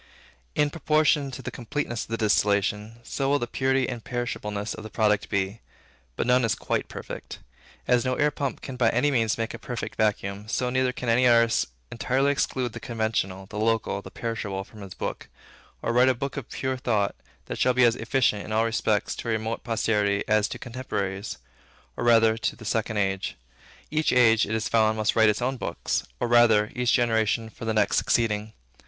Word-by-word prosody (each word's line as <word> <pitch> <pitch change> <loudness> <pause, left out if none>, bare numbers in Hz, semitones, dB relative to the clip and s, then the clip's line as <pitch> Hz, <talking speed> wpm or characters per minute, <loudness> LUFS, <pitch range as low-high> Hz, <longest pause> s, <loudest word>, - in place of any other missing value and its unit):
In 150 -1 +2
proportion 155 -3 +2
to 130 0 -8
the - - -5
completeness 120 -1 -3
of - - -25
the 115 - -2
distillation, 105 +1 +1
so 135 +3 -2
will 145 - +4
the 120 - -2
purity 130 +1 +1
and 120 -3 -5
imperishableness 105 -4 -3
of 110 - -8
the 110 - -7
product 105 -2 +1
be. 100 +1 -1 0.5
But - - -1
none 125 +1 +4
is 115 -3 +1
quite - - -2
perfect. - - -7 0.5
As 125 -1 +3
no 130 0 0
air 150 +2 +2
pump 140 -2 -3
can 130 -2 -7
by 120 -2 +4
any 145 +6 +2
means 115 -5 +1
make 115 0 -3
a - - -7
perfect 120 -2 -5
vacuum, 105 -1 -1
so 125 +3 -1
neither 130 0 +2
can 125 -1 -6
any 125 +2 +4
artist 115 -1 +4 0.2
entirely 135 +3 +1
exclude 130 -4 -1
the - - -6
conventional, 110 -7 -2
the 105 +2 -7
local, 115 0 0
the - - -10
perishable 105 -4 -4
from 105 +1 -14
his 95 -2 -9
book, - - -5 0.5
or 115 - 0
write 125 +2 +5
a 130 - +2
book 140 +3 -4
of 135 -4 -6
pure 130 -1 -2
thought, 110 -5 0 0.3
that - - -6
shall 125 -1 +3
be 125 - +5
as 120 -1 +5
efficient, 120 -8 +1
in - - -8
all 110 +1 +2
respects, 110 -2 0
to 115 - -5
a - - +2
remote 110 +1 -3
posterity, 105 -3 +1
as 110 -1 +3
to - - -6
contemporaries, 105 -5 -4 0.6
or - - -4
rather 115 -2 +5
to - - -1
the 115 - -12
second 110 0 -1
age. 95 -1 -1 0.6
Each 155 0 +1
age, 115 -3 +5
it 110 - -1
is 110 - -1
found, 110 -1 +3
must 110 -1 +1
write 110 -1 +6
its 105 +3 0
own 130 +1 -1
books; 85 -7 -2
or 120 - 0
rather, 115 -3 +5
each 125 -1 +1
generation 115 -2 +2
for 115 - -9
the 110 - 0
next 105 -2 +2
succeeding. 110 -2 +1
115 Hz, 200 wpm, -26 LUFS, 105-125 Hz, 0.6 s, write